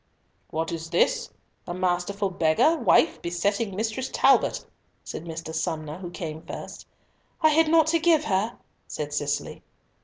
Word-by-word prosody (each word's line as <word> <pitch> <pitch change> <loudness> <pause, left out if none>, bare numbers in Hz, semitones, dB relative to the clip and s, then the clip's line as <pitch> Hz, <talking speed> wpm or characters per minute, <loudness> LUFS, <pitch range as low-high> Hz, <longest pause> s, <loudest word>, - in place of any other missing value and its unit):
"What 160 +1 -2
is 165 -1 -5
this? 470 - +1 0.4
A 175 - -4
masterful 185 +2 -1
beggar 175 - +3
wife 325 0 +3
besetting 200 +4 -1
Mistress 220 +5 -2
Talbot," - - +3 0.4
said 165 - -7
Mr. 165 -1 -6
Somer, 160 0 -3
who 180 -2 -6
came 160 -3 -6
first. - - -9 0.5
"I 315 - +6
had 320 +1 +4
naught 320 0 +5
to 335 - +4
give 325 -2 +4
her," 210 +3 0 0.3
said 145 -1 -5
Cicely. 145 -1 -2
185 Hz, 145 wpm, -26 LUFS, 160-245 Hz, 0.5 s, I